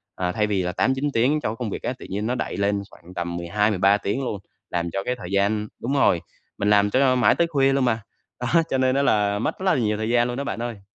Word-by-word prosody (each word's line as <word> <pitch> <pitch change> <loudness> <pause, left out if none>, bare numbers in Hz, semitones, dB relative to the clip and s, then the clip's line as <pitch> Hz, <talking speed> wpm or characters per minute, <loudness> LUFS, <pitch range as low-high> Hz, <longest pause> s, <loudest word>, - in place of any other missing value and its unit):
À, 90 -1 -1
thay 105 +2 0
vì 100 -3 0
là 90 - -1
8-9 130 +8 0
tiếng 135 +7 +2
cho - - -1
cái 110 - -4
công 120 - -2
việc - - -6
á, - - -1
tự - - -9
nhiên 105 +3 -2
nó 125 - 0
đẩy - - -3
lên 100 0 +1
khoảng 90 +2 -15
tầm 85 -1 -3
12-13 100 +2 +2
tiếng 105 +6 -2
luôn, 105 -5 -3 0.3
làm 85 -1 -2
cho 95 +2 -2
cái 125 - -1
thời 105 -6 -9
gian 105 +2 +1
đúng 130 +4 -2
rồi, 90 -11 +3 0.4
mình 100 - 0
làm 105 0 +4
cho 130 +3 +3
mãi 125 - +4
tới 170 - +2
khuya 135 -4 +2
luôn 135 -1 +2
mà, 115 -2 +1 0.4
đó, 165 +7 +3
cho 135 - +1
nên 130 0 +2
á 140 - +3
là 105 -6 +2
mất 115 - -2
rất 190 - -5
là 185 - +4
nhiều 105 -4 0
thời 110 +1 -2
gian 120 0 +3
luôn 125 +1 -4
đó 140 - -2
bạn 125 - -4
ơi. 120 -4 -5
110 Hz, 280 wpm, -23 LUFS, 100-130 Hz, 0.4 s, làm